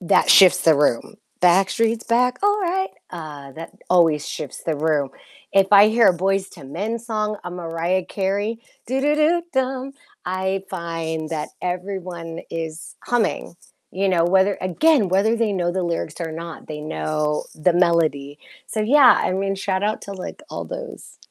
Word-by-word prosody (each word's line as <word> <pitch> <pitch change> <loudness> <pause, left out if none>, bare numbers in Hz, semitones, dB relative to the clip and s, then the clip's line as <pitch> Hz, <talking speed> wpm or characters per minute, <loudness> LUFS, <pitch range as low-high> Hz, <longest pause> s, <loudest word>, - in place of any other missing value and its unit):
that 175 - +3
shifts 185 -2 +7
the 160 - +5
room. 140 -5 0 0.2
"Backstreet's 195 +6 +2
back, 250 +2 +1
all 410 +1 +2
right." 380 +1 -1 0.2
Uh, 150 -5 -9
that 165 +4 -9 0.2
always 165 -5 +3
shifts 150 -4 -7
the 160 -2 -1
room, 150 -2 0 0.4
if 195 -1 +4
I 205 +1 +8
hear 225 0 +4
a 180 - +2
Boyz 195 +2 -1
II - - -11
Men 210 +10 -3
song, 215 -2 -2
a 180 - -6
Mariah 175 +1 -2
Carey, 200 +4 -2 0.3
"do, 260 +3 -1
do, 295 +2 +2
do, 325 +3 +3
dum," 265 0 -2 0.3
I 190 +1 -2
find 165 -2 -4
that 155 -2 -3
everyone 180 -2 -5
is 160 -1 -6
humming, 235 -7 -1 0.4
you 195 +1 -1
know, 170 -2 +2
whether, 190 +3 +2
again, 215 - +2
whether 200 +5 +2
they 225 -2 0
know 175 -2 -1
the 185 +1 -1
lyrics 170 -1 -3
or 165 -1 -3
not, 165 0 -8
they 150 -1 -6
know 150 -1 -2
the 165 +3 +2
melody, 155 -5 +1 0.3
so, 220 - -3
yeah, 255 +2 +6
I - - 0
mean, 195 +1 -1
shout 190 0 -2
out 215 +1 -1
to, 200 - -7
like, 190 -2 -8
all - - -5
those - - -9
185 Hz, 170 wpm, -21 LUFS, 165-220 Hz, 0.4 s, I